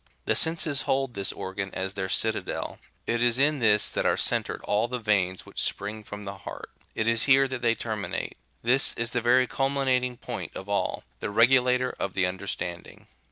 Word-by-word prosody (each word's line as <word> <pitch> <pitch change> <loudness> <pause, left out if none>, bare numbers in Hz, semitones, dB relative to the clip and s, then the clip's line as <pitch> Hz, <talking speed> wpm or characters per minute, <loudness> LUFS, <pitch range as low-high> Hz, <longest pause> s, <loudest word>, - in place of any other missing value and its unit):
The - - +2
senses 160 -4 +2
hold 135 -2 +1
this 100 -2 -1
organ 95 +1 -5
as 95 +1 -3
their 95 -1 -3
citadel; - - -1 0.3
it 120 0 0
is 120 0 +4
in 145 +2 +3
this 105 -3 +4
that - - -1
are - - +2
centred - - 0
all 105 +3 +1
the 125 +1 -3
veins 95 -5 0
which - - -4
spring 105 +2 -2
from 105 0 -8
the 100 0 -7
heart; - - -8 0.2
it 110 - -1
is 115 0 +3
here 135 0 +5
that 130 -2 -5
they 115 -1 +3
terminate; 110 -3 -4 0.3
this 125 +4 +4
is 115 0 -2
the 120 - 0
very 125 +2 +4
culminating 130 -2 0
point - - -6
of 95 - -7
all, 100 0 -1 0.2
the - - -3
regulator 125 +3 +4
of 95 - -3
the 95 - +2
understanding. 90 -1 -5
115 Hz, 190 wpm, -27 LUFS, 100-130 Hz, 0.3 s, here